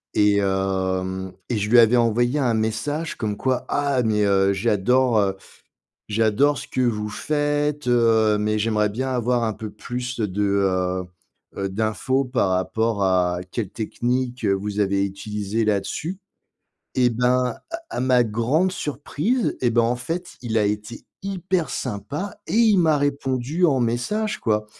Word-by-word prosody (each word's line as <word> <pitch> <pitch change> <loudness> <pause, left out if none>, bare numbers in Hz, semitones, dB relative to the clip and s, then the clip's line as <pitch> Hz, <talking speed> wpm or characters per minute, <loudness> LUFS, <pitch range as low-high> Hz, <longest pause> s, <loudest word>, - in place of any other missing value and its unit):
et 105 0 +4
hem, 95 -1 -1 0.2
et 120 - 0
je 105 +1 -1
lui 120 - +6
avais 115 +2 +6
envoyé 120 +4 +2
un 125 -4 +2
message 110 +9 -2
comme 105 -2 -2
quoi 130 -1 -1
«Ah 140 -3 +1
mais, 105 -2 +1
heu, 100 -1 +3
j'adore, 115 +4 +2
heu, 95 -1 +1 0.7
j'adore 115 +7 +2
ce - - -7
que 130 - -3
vous 105 -4 0
faites, 145 +1 -1
heu, 115 -3 +4
mais 105 +1 0
j'aimerais 105 -1 +1
bien 130 +6 -3
avoir 120 -1 +1
un 110 - 0
peu 110 0 -7
plus 125 +2 -5
de, 105 -2 -1
heu, 95 -2 +1 0.5
heu, 100 0 -2
d'infos 110 +6 0
par 125 -6 0
rapport 100 +3 0
à 90 -1 +2
quelle 105 -5 -3
technique, 120 +3 -2
heu, 100 -1 +3
vous 105 +1 -3
avez 100 0 +2
utilisée 105 +2 -3
là 105 -2 +2
dessus». 170 - -5 0.8
Et 125 -1 +4
ben, 125 +1 +1 0.2
à 335 - -2
à - - -3
ma 125 -1 +4
grande 120 - +1
surprise, 155 - -1
et 120 -2 +2
ben, 120 0 +3
en 120 +2 +1
fait 170 +7 -5
il 115 -2 -2
a 105 - +2
été 105 +2 -3 0.2
hyper 185 -3 -1
sympa 145 - -4
et - - -3
il 220 -3 +5
m'a 160 -4 +4
répondu 140 +3 -1
en 140 -5 +2
message 130 - -1
quoi 105 -2 0
115 Hz, 160 wpm, -23 LUFS, 105-130 Hz, 0.8 s, lui